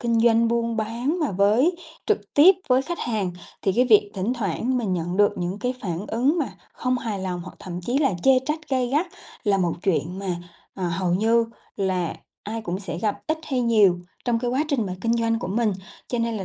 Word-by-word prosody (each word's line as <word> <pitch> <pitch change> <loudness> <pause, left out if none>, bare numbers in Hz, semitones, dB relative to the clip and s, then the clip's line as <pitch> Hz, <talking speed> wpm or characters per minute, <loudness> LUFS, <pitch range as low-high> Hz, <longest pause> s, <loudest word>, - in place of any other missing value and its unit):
kinh 235 -1 +2
doanh 230 0 +4
buôn 235 0 0
bán 235 +9 -1
mà 295 - +1
với 210 - +4 0.3
trực - - -1
tiếp 340 +7 +8
với 255 +1 +4
khách 345 +5 -4
hàng, 210 -6 -1 0.3
thì 195 - +2
cái 245 +6 +3
việc 210 -4 +5
thỉnh 195 +5 -1
thoảng 230 +4 -1
mình 205 -6 -1
nhận 175 +1 -2
được 205 0 +4
những 180 +3 -2
cái 250 +2 -1
phản 180 +1 -3
ứng 265 +9 +2
mà 300 - -1 0.2
không 255 0 -1
hài 220 -5 -3
lòng 180 -2 -3
hoặc 185 - -10
thậm 180 -1 -6
chí 245 +9 0
là 275 -10 +2
chê 265 -1 +6
trách 310 +1 -3
gay 260 -2 +1
gắt 300 +8 +1 0.4
là 200 -2 +3
một 175 -2 +1
chuyện 180 0 0
mà, 185 -3 -2 0.4
ờ, 185 -2 -2
hầu 175 0 0
như 230 +4 +3 0.3
là 185 -3 -1 0.3
ai 220 +2 -5
cũng 180 -1 -3
sẽ 190 - -5
gặp 210 +2 0
ít 315 0 0
hay 265 -4 -1
nhiều 215 -7 +4 0.3
trong 240 -2 +1
cái 240 +1 -1
quá 270 +5 +1
trình 245 -9 0
mà 180 - -4
kinh 230 +2 +1
doanh 230 0 +1
của 200 - -5
mình. 215 +2 +1 0.4
Cho 245 - -1
nên 230 -1 0
là 195 - -4
225 Hz, 225 wpm, -24 LUFS, 190-250 Hz, 0.4 s, tiếp